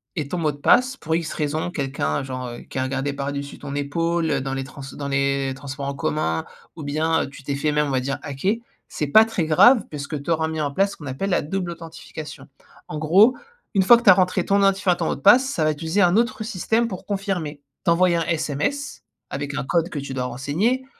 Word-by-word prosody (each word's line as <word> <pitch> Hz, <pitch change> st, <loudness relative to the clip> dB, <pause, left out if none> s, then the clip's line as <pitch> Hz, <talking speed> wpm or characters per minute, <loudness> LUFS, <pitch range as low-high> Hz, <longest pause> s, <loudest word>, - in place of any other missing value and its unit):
et 155 Hz, -5 st, -2 dB
ton 180 Hz, -, -3 dB
mot 155 Hz, -3 st, +1 dB
de 145 Hz, -, -11 dB
passe 255 Hz, -, +4 dB
pour 160 Hz, -, -2 dB
X 165 Hz, -1 st, -2 dB
raisons, 155 Hz, +3 st, -2 dB
quelqu'un 135 Hz, -, -2 dB
genre, 130 Hz, -1 st, -5 dB
heu, 120 Hz, -, -8 dB
qui -, -, -9 dB
a 130 Hz, -, +1 dB
regardé 135 Hz, +2 st, -2 dB
par 140 Hz, 0 st, -3 dB
dessus 140 Hz, 0 st, -6 dB
ton 140 Hz, -1 st, -7 dB
épaule, 165 Hz, +4 st, -1 dB
heu, 140 Hz, -2 st, +1 dB
dans 135 Hz, 0 st, -3 dB
les 135 Hz, 0 st, -2 dB
trans 135 Hz, +1 st, -11 dB
dans 140 Hz, -, -5 dB
les 140 Hz, -1 st, 0 dB
transports 140 Hz, 0 st, -6 dB
en 140 Hz, -, -3 dB
commun, 80 Hz, -, -1 dB, 0.3 s
ou 155 Hz, -, -8 dB
bien 155 Hz, +3 st, 0 dB
tu 145 Hz, -, -12 dB
t'es 140 Hz, 0 st, -2 dB
fait 150 Hz, +2 st, 0 dB
même 150 Hz, 0 st, +1 dB
on -, -, -3 dB
va 130 Hz, -1 st, +1 dB
dire 135 Hz, +1 st, -3 dB
hacker, 145 Hz, +9 st, -1 dB, 0.3 s
c'est 150 Hz, -, -3 dB
pas 220 Hz, +10 st, +7 dB
très 220 Hz, -7 st, -2 dB
grave 215 Hz, -, +6 dB
puisque 145 Hz, 0 st, -5 dB
tu 140 Hz, -, -8 dB
auras 160 Hz, -1 st, +1 dB
mis 160 Hz, -1 st, -3 dB
en 145 Hz, -, -1 dB
place 195 Hz, +7 st, +1 dB
ce -, -, -10 dB
qu'on 150 Hz, -, -9 dB
appelle 160 Hz, +10 st, -3 dB
la -, -, +2 dB
double 180 Hz, +3 st, -3 dB
authentification. 160 Hz, -4 st, -9 dB, 0.4 s
En 150 Hz, -, -5 dB
gros, 195 Hz, +11 st, +5 dB, 0.4 s
une 195 Hz, -, +4 dB
fois 235 Hz, +5 st, +8 dB
que 235 Hz, -, -6 dB
tu 220 Hz, -, +6 dB
as -, -, +10 dB
rentré 185 Hz, -1 st, +1 dB
ton 200 Hz, 0 st, +3 dB
identifiant, 195 Hz, -2 st, +3 dB
ton 170 Hz, -1 st, -3 dB
mot -, -, 0 dB
de -, -, -12 dB
passe, 245 Hz, +7 st, +7 dB
ça 165 Hz, -, -1 dB
va 155 Hz, -, +3 dB
utiliser 160 Hz, +6 st, -1 dB
un 175 Hz, +1 st, +4 dB
autre 235 Hz, 0 st, 0 dB
système 225 Hz, +2 st, 0 dB
pour 185 Hz, -5 st, -7 dB
confirmer, 190 Hz, -7 st, -3 dB, 0.2 s
t'envoyer 175 Hz, 0 st, +3 dB
un 165 Hz, -, 0 dB
SMS, 165 Hz, -, -2 dB, 0.3 s
avec 140 Hz, +1 st, -4 dB
un -, -, -2 dB
code 170 Hz, +3 st, +1 dB
que 150 Hz, -, -4 dB
tu 135 Hz, -1 st, -6 dB
dois 130 Hz, -1 st, -2 dB
renseigner, 155 Hz, -, -1 dB
155 Hz, 245 wpm, -23 LUFS, 140-185 Hz, 0.4 s, as